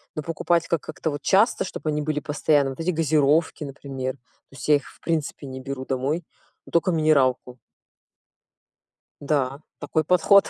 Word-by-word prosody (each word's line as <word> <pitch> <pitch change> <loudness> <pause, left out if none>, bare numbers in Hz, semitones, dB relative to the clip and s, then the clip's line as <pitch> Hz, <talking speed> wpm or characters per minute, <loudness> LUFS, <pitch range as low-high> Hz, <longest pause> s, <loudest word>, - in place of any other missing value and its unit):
но 155 - -2
покупать, 165 +1 0
как 165 -3 0
как-то 155 +1 -4
вот 145 - -5
часто, 205 +5 +3
чтобы 160 - -4
они 150 0 0
были 150 0 -1
постоянно, 145 -1 +1
вот 130 - -10
эти 165 +2 -1
газировки, 155 -1 +2
например. 135 -2 -5
То 135 +1 -24
есть, - - -7
я 150 - +7
их 145 - -2
в - - -17
принципе 155 -3 -2
не 130 0 -7
беру 130 0 -5
домой. 135 +6 -1 0.4
Ну - - -14
токо 170 +2 +3
минералку. 135 -6 +2 1.6
Да, 140 -2 0 0.2
такой 155 - 0
подход. 180 +4 +5
150 Hz, 165 wpm, -24 LUFS, 135-160 Hz, 1.6 s, я